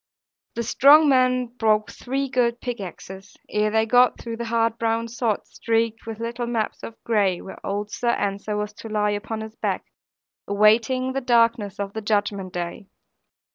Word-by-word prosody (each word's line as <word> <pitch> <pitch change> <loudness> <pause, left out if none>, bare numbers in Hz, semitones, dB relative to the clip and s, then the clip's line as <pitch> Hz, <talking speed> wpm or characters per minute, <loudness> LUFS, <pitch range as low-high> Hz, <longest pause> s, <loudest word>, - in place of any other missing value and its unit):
The 235 - -2
strong 290 +6 +6
men 255 -1 +3
broke 220 -3 0
three 270 +2 -3
good 240 -2 +1
pickaxes, 195 -4 -7
ere 210 0 +1
they 220 +1 +2
got 245 +2 +4
through 230 -1 -6
the 235 - -4
hard 230 0 0
brown 230 0 0
sod, 230 -2 -2
streaked 225 -1 -1
with 225 -1 -6
little 235 +1 -3
maps 230 -3 -2
of 230 - -8
gray 200 -6 +1
where 190 - -11
old 205 +1 -3
Sir 240 - -1
Ensor 205 -1 -1
was 210 0 -3
to 225 - -10
lie, 210 -1 +1
upon 215 +2 -4
his 220 0 -8
back, - - -2 0.6
awaiting 225 +6 +3
the 270 - -1
darkness 230 -5 +2
of 200 -1 -4
the 220 - -4
Judgment 205 -3 -1
day. 175 +2 -5
225 Hz, 170 wpm, -23 LUFS, 210-240 Hz, 0.6 s, strong